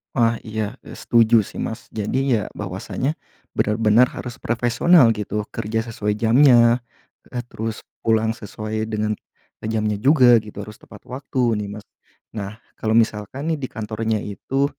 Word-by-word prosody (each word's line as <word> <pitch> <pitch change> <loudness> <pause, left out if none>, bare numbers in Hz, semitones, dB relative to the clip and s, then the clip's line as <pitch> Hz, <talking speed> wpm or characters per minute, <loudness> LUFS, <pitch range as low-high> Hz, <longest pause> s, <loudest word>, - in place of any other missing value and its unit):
Wah, 115 -2 +2
iya, 110 0 -3
eee, - - -11
setuju 115 -2 +4
sih - - -7
Mas. 110 - -5
Jadi 130 +5 0
ya 105 - 0
bahwasanya 100 - -3 0.4
benar-benar 110 +3 +3
harus 125 -2 -8
profesional 120 +3 +4
gitu, 105 0 -3
kerja 110 +1 -2
sesuai 105 -2 -2
jamnya, 120 0 +5 0.5
eee, 120 -1 -4
terus 110 -2 -5 0.2
pulang 110 0 +2
sesuai 110 +1 -5
dengan, 110 0 0 0.5
eee, 110 - -4
jamnya 105 -2 -1
juga 125 -4 +6
gitu, 105 -1 -8
harus 105 0 -12
tepat - - -15
waktu 125 -2 -1
nih 100 - -5
Mas. 105 - -11 0.5
Nah 105 0 -5 0.2
kalau 110 0 0
misalkan 115 +8 0
nih 155 - -3
di 130 - -2
kantornya 110 0 -2
itu, 135 +7 -2
110 Hz, 150 wpm, -22 LUFS, 105-120 Hz, 0.5 s, juga